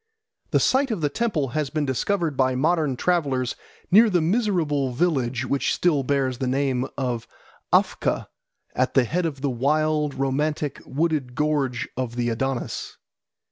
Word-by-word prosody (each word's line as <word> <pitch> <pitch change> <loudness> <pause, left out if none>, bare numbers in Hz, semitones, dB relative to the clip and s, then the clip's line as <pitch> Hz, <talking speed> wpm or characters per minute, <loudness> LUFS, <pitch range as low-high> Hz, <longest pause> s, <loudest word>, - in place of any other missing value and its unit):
The - - +3
site 265 +1 +2
of 215 -7 -2
the 145 - +1
temple 170 - -1
has 150 +1 -2
been 155 -1 -1
discovered 160 +4 0
by 130 -1 +2
modern 155 -1 +1
travellers 140 -8 0 0.4
near 220 +4 +7
the 180 -3 +2
miserable 160 - +1
village 130 -5 0
which 140 +1 0
still 160 -6 +2
bears 130 -2 0
the 130 - -1
name 130 -1 0
of 125 -4 -2 0.4
Afka - - +2 0.5
at 130 - 0
the 135 - +6
head 165 +8 0
of 140 -4 -6
the 140 -1 0
wild, 150 +3 +1
romantic, 145 +2 -1
wooded 145 -4 -1
gorge 145 -5 0
of 125 -2 -3
the 120 0 0
Adonis. 135 +2 -3
140 Hz, 150 wpm, -24 LUFS, 130-160 Hz, 0.5 s, near